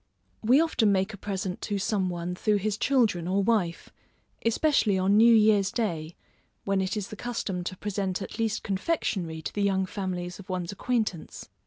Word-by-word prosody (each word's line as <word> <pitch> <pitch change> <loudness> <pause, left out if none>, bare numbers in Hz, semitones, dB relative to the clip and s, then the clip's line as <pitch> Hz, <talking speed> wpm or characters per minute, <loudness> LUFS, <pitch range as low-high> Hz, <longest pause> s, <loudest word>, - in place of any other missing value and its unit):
We 245 +6 +5
often 285 -10 +2
make 190 +2 +1
a - - -5
present 190 -2 -4
to 205 - -2
some 195 -1 0
one 175 0 -3
through 210 +4 +1
his 205 +1 0
children 215 -9 +1
or 195 +2 +1
wife, 195 -6 0 0.5
especially 230 -4 +2
on 190 +2 +3
new 230 +2 +7
year's 210 -3 +4
day, 170 -8 -2 0.5
when 195 -1 +1
it 190 +1 -2
is 205 -2 -4
the - - -7
custom 210 -6 -3
to 185 - -4
present 195 -2 -2
at 200 - -7
least 225 -1 -1
confectionary 190 - -2
to - - -5
the 205 - -2
young 195 -1 +2
families 185 -2 -4
of 195 0 -12
one's 180 -1 -3
acquaintance. 215 -5 -3
200 Hz, 180 wpm, -27 LUFS, 185-215 Hz, 0.5 s, new